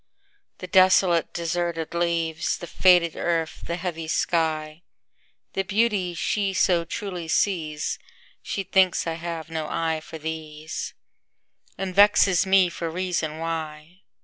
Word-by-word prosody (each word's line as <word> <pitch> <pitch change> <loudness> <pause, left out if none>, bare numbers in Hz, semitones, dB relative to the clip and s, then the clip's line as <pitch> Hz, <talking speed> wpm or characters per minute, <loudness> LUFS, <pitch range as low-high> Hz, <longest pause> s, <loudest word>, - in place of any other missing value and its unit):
The - - -7
desolate, 185 -2 +4
deserted 170 -1 -2
trees, 170 -2 -1
The - - -7
faded 175 -2 +4
earth, 165 -2 -2
the 170 - -2
heavy 170 -2 -4
sky, 160 -1 -1 0.7
The 195 - 0
beauties 195 -4 0
she 195 +3 0
so 175 -3 +3
truly 180 -1 -5
sees, 160 -4 0 0.4
She 195 - -3
thinks 190 -1 +2
I 165 - -1
have 165 -1 -6
no 160 -1 -3
eye 165 -1 -1
for 160 - -9
these, 155 0 -6 0.8
And 190 -1 -3
vexes 200 -2 +5
me 190 -1 +5
for 170 -1 -4
reason 170 -3 -2
why. 160 +1 -5
170 Hz, 125 wpm, -24 LUFS, 160-185 Hz, 0.8 s, vexes